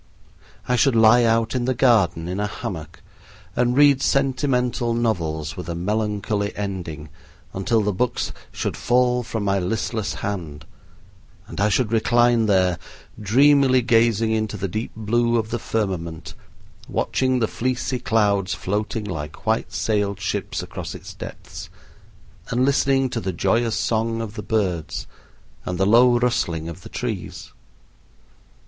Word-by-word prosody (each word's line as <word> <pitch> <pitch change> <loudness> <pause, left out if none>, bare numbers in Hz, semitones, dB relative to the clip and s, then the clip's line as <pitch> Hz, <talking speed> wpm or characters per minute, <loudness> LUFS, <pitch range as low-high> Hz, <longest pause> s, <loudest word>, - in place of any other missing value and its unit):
I 125 - +2
should 135 -1 +3
lie 115 +2 +6
out 115 0 +2
in 125 -2 -1
the 130 0 0
garden 105 -10 +3
in 90 +2 -3
a 105 - 0
hammock 80 -5 -7 0.5
and 125 +1 +1
read 145 -2 +6
sentimental 130 -4 +1
novels 80 -10 -1
with 90 -2 -7
a 85 - -3
melancholy 105 +2 -1
ending, 85 -7 -5 0.4
until 110 +4 +1
the 105 0 0
books 125 +6 -1 0.2
should - - -3
fall 125 0 +2
from 115 -2 -4
my 100 -1 +1
listless 105 +1 -2
hand, 80 -7 -5 0.8
and - - -6
I 105 - +3
should 105 +2 +1
recline 120 0 +3
there, 95 -3 +2 0.4
dreamily 130 +3 +4
gazing 115 -1 +3
into 110 -2 -1
the 100 - -2
deep 110 +6 -4
blue 120 +2 +1
of 110 -1 -2
the 120 - -1
firmament, 85 -9 -3 0.5
watching 130 -1 0
the 115 -3 +1
fleecy 125 +2 -2
clouds 100 -5 +1
floating 105 +4 -2
like 75 -7 -6
white 110 +1 0
sailed 100 -3 -1
ships - - -3
across - - -7
its - - -10
depths, - - -9 0.8
and 125 +2 +1
listening 135 -1 +2
to 120 - -2
the 95 -4 -3
joyous 115 +6 +1
song 115 0 0
of 110 -2 -5
the 110 - -6
birds 90 -8 -2 0.6
and 90 - -3
the 95 - +2
low 120 +4 +5
rustling 85 -10 0
of 85 - -8
the - - -11
trees. - - -5
110 Hz, 145 wpm, -22 LUFS, 95-120 Hz, 0.8 s, lie